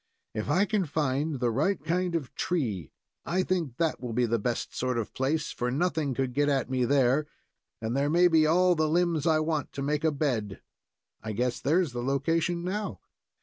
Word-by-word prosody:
"If 110 +4 -3
I 185 +7 +3
can 205 -4 0
find 145 0 -1
the 120 -1 +1
right 155 - +1
kind 180 +1 0
of 145 -7 -3
tree, 110 - -2 0.3
I 185 +2 0
think 165 -11 -2
that 165 -2 0
will 120 -2 -5
be 125 +2 +2
the 115 0 0
best 120 +3 -3
sort 125 -1 -1
of 115 - -2
a - - -43
place, 150 +4 -1
for 125 - -2
nothing 150 -1 0
could 130 -1 -1
get 145 +2 +2
at 135 -2 0
me 130 -1 +1
there, 140 +2 +3 0.5
and 115 +2 -3
there 140 +1 +1
may 175 +3 +5
be 160 -2 +4
all 180 +3 +4
the 155 -2 +1
limbs 170 -2 +1
I 160 -1 +4
want 155 -3 -1
to 140 - -4
make 150 +1 -1
a 160 - +3
bed. 125 -9 -2 0.6
I 110 -1 -4
guess 120 +3 -1
there's 165 +2 +1
the 120 0 -4
location 165 +6 0
now." 185 - -3
145 Hz, 205 wpm, -28 LUFS, 125-165 Hz, 0.6 s, may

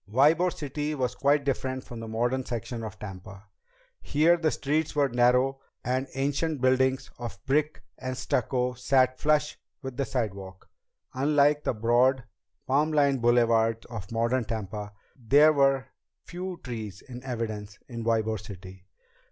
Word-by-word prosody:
Ybor 155 +9 +4
City 150 +1 -4
was 125 -3 -1
quite 140 +2 +2
different 130 -1 -2
from 120 -3 -9
the 115 - -6
modern 120 +4 0
section 120 -1 -5
of 110 -2 -7
Tampa. 95 0 -9 0.6
Here 160 +4 +3
the 165 -2 +1
streets 150 +2 -1
were 145 -2 +3
narrow 125 +2 +3 0.2
and 130 +2 -1
ancient 145 +3 -1
buildings 130 +1 +2
of 120 -4 -6
brick 150 +3 0 0.2
and 130 0 -4
stucco 125 0 0
sat 130 +1 +2
flush 150 -1 +1 0.2
with 130 -1 -6
the 140 - 0
sidewalk. 100 -7 -4 0.5
Unlike 145 +2 +3
the - - 0
broad, 120 +4 +3 0.4
palm 145 +3 +2
lined 140 -4 +2
boulevards 115 -1 +3
of 105 -3 -7
modern 115 +2 +1
Tampa, 105 -1 -5 0.2
there 145 +5 +5
were 135 -2 +2 0.4
few 180 0 -6
trees 110 -5 -6
in 125 -1 -8
evidence 110 -5 -4
in 115 -2 -6
Ybor 110 -1 +1
City. 95 -2 -11
130 Hz, 145 wpm, -27 LUFS, 115-140 Hz, 0.6 s, there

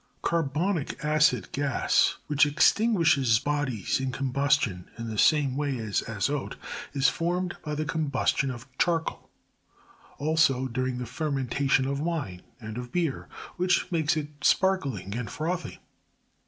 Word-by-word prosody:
[Carbonic 165 0 -1
acid 150 -8 +2
gas, 140 -2 +2
which 150 0 +3
extinguishes 160 - +4
bodies 140 -6 -1
in 130 -1 -2
combus 140 +2 +1
tion 90 -9 -4
in 115 -1 -5
the 110 - -5
same 145 -4 +4
way 145 -2 -1
as 110 -4 -1
azote, - - -2 0.4
is 135 -1 +2
formed 175 +4 -1
by 150 -1 -3
the 155 +1 -2
combustion 140 -3 0
of 120 -2 -7
charcoal; 165 -2 0 0.9
also, 145 -4 +2
during 130 +1 -2
the 125 - -4
fermentation 135 0 0
of 140 +1 -2
wine, 145 - -3 0.2
and 110 0 -6
of 125 -1 -8
brer, 165 -6 -1 0.3
which 180 0 +1
makes 160 -2 +1
it 150 -1 -3
sparkling 140 - +1
and 120 -3 -4
frothy. 175 +7 -3
140 Hz, 135 wpm, -27 LUFS, 125-160 Hz, 0.9 s, extinguishes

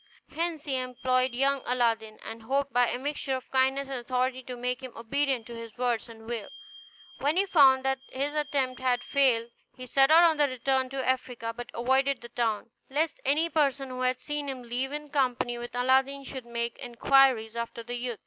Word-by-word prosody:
Hence 330 -2 -2
he 270 -3 -1
employed 255 0 0
young 275 +1 +2
Aladdin, 225 -3 0
and 225 0 -7
hoped 275 +4 -1
by 245 0 +4
a - - -1
mixture 275 0 -2
of 260 - -8
kindness 265 +1 +2
and 270 -2 -4
authority 255 +1 -1
to 250 0 -7
make 250 +1 -3
him 255 -2 -8
obedient 260 +1 -1
to 235 - -9
his 230 -1 -9
word 240 -2 +1
and 225 -1 -12
will. 230 -3 -5 0.7
When 295 +5 +1
he 390 - +3
found 270 -7 +5
that 270 0 +1
his 280 +3 -2
attempt 280 -4 -1
had 250 -1 +1
failed, 245 -5 +2 0.2
he 255 - -8
set 270 +2 +4
out 330 0 +7
to - - +6
return 260 0 0
to 265 -1 -3
Africa, 250 -3 -1
but 240 0 -7
avoided 265 +3 +1
the 235 - -10
town, 230 -2 -1 0.2
lest 300 +3 -1
any 300 +5 +3
person 280 -4 +1
who 255 0 -5
had 255 0 +1
seen 295 -1 -4
him 260 -2 -5
leave 245 +3 -3
in 295 0 -6
company 250 -3 0
with 240 0 -7
Aladdin 265 +2 +2
should 260 -3 -7
make 235 0 -3
inquiries 245 -2 +3
after 235 0 -4
the 240 +1 -6
youth. 245 -2 -4
255 Hz, 195 wpm, -28 LUFS, 240-275 Hz, 0.7 s, out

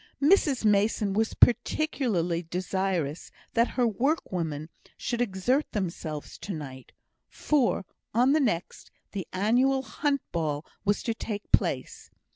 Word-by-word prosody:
Mrs 290 - +3
Mason 210 -1 +2
was 220 +2 0
particularly 235 - +2
desirous 180 -2 -2 0.2
that 235 +1 +4
her 250 - +4
workwomen 185 - -1 0.3
should 240 -1 -2
exert 245 +6 0
themselves 170 -7 -4
to 200 - -5
night, 130 -4 -8 0.4
for, 270 -9 +1 0.3
on 245 +4 +4
the 310 - +4
next, 190 - -2 0.2
the 195 -4 -5
annual 250 +8 +2
hunt 285 0 -1
ball 155 -2 -2 0.2
was 205 0 +1
to 230 - 0
take 210 -2 -6
place. - - +1
205 Hz, 120 wpm, -28 LUFS, 175-250 Hz, 0.4 s, that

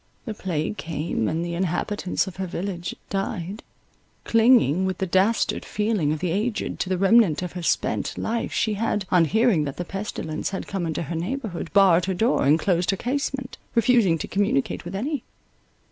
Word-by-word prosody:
The 225 - -3
plague 180 -1 -3
came, 155 -8 -2
and 165 +2 -1
the 170 - -4
inhabitants 180 +2 -1
of 190 -2 -9
her 190 -1 -3
village 180 0 -4 0.2
died. 195 0 -3 0.6
Clinging, 225 - +4
with 190 -1 -1
the 190 - -1
dastard 190 +5 +1
feeling 210 -8 0
of 155 - 0
the 175 +2 -2
aged, 215 +5 -2
to 185 - -2
the 185 - +1
remnant 195 -3 +4
of 180 - -4
her 180 - -6
spent 165 - -1
life, 230 +1 -2
she 220 - 0
had, 210 -1 -1
on 175 -2 +5
hearing 220 -2 +3
that 140 - -5
the 180 - -3
pestilence 195 -5 -4
had 190 - -4
come 190 -4 -3
into 160 +1 -2
her 165 +2 -5
neighbourhood, 185 -1 -4
barred 185 -4 +5
her 190 0 -1
door, 220 - +2
and 150 +3 +6
closed 175 +1 +1
her 195 - +2
casement, 265 +1 -3 0.2
refusing 230 -7 +4
to - - -5
communicate 215 +2 0
with 175 +2 -6
any. 270 +6 -2
190 Hz, 185 wpm, -24 LUFS, 170-220 Hz, 0.6 s, and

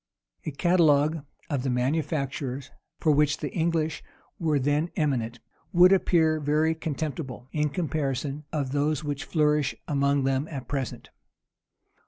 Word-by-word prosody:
A - - -1
catalogue 155 -1 +3 0.2
of 145 -5 -1
the 135 - -1
manufactures 140 0 -1 0.3
for 155 - +3
which 150 0 +3
the 150 - -5
English 160 -2 0 0.4
were 155 -3 +2
then 145 +5 +1
eminent, 120 -7 -1 0.3
would 180 0 +7
appear 160 -4 +3
very 155 +2 +2
contemptible, 150 -5 -4
in 150 -1 0
comparison 145 -2 -2
of 140 -4 -2
those 145 +1 0
which 145 +1 -3
flourish 150 -4 +1
among 140 -1 +2
them 135 +2 0
at 135 -5 -7
present. 135 -5 -4
150 Hz, 130 wpm, -27 LUFS, 140-160 Hz, 0.4 s, would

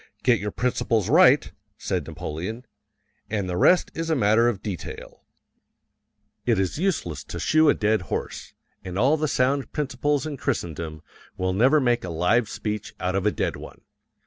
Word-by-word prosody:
"Get 120 -3 +4
your 105 - -3
principles 115 -2 0
right," 155 -4 +5 0.3
said 90 -6 -3
Napoleon, 90 +8 -6 0.6
"and 105 -3 -2
the 90 - -3
rest 180 - +4
is 165 0 -4
a 160 - +2
matter 115 -1 +4
of 105 -4 -5
detail." 100 -6 -7 1.2
It 120 -2 +2
is 95 - -1
useless 90 - -1
to - - -7
shoe 155 -1 +4
a - - +4
dead 105 -1 +1
horse, - - -5 0.3
and 95 0 -6
all 135 +8 +4
the 155 0 -1
sound 135 0 0
principles 145 0 -1
in 150 -3 -5
Christendom 80 - -4 0.3
will 95 0 -1
never 130 +10 +4
make 120 -3 +1
a 90 - -5
live 90 +8 +1
speech 105 -1 -5
out 90 0 -1
of 95 +2 0
a - - +3
dead - - -2
one. - - -11
110 Hz, 170 wpm, -24 LUFS, 95-140 Hz, 1.2 s, right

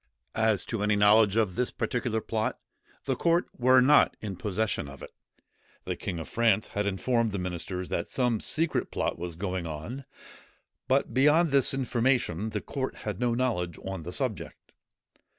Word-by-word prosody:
As 110 -2 +1
to 115 -3 -3
any 105 0 +2
knowledge 105 0 +5
of 110 -5 +2
this 125 +5 0
particular 120 -3 -2
plot, 110 0 -2 0.5
the 135 - 0
court 170 +6 +2
were 130 +1 +5
not 145 +4 +5
in 100 -3 -5
possession 105 -5 -2
of 70 -1 -11
it. - - -9 0.7
The - - -2
king 90 - -5
of 80 - -6
France 110 -2 +2
had 105 0 -2
informed 115 +3 0
the 100 - -3
ministers 90 0 -4
that 85 - -2
some 125 -4 0
secret 160 +7 0
plot - - -2
was 85 -1 -5
going 90 -1 -3
on; 95 - -6 0.8
but 135 +2 +1
beyond 150 +5 +4
this 140 -2 +4
information 120 -6 0
the 105 -1 -3
court 135 -2 -4
had 105 -3 -3
no 120 -1 +1
knowledge 100 -10 -1
on 95 -2 -4
the 85 +3 -7
subject. 120 0 -5
110 Hz, 170 wpm, -28 LUFS, 95-125 Hz, 0.8 s, knowledge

